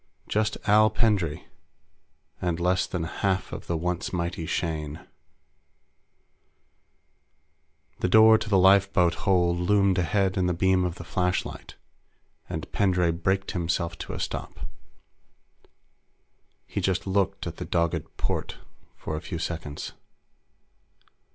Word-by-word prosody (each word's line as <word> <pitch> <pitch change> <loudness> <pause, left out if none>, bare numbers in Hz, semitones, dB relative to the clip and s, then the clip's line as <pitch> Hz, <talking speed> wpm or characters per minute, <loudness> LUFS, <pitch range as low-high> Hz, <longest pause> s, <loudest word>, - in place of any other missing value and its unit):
Just 110 0 0
Al 105 +1 +6
Pendray 95 -10 0 1.0
and 90 -2 -1
less 90 +1 +1
than 90 -3 -3
half 95 +3 -1
of - - -7
the 85 - -1
once 90 +3 -2
mighty 85 -2 -3
Shane. 75 -3 -3 2.9
The 90 - 0
door 110 +2 +7
to 110 - -5
the 100 - +4
lifeboat 95 -2 +4
hold 90 -3 +1
loomed 95 0 +3
ahead 95 +1 +1
in 90 -1 +2
the 90 - 0
beam 95 0 +2
of 85 -1 -3
the 85 - -9
flashlight, 90 +2 -2 0.7
and - - -5
Pendray 90 -4 +2
braked 95 +4 -1
himself 85 -1 -1
to - - -6
a - - -5
stop. - - -5 2.0
He - - -4
just 95 -1 0
looked 100 0 0
at 85 -1 -6
the - - -5
dogged 85 -2 -1
port - - -3 0.4
for 80 - -5
a 75 - -4
few 85 - -5
seconds. 80 -3 -5
90 Hz, 125 wpm, -26 LUFS, 85-95 Hz, 2.9 s, door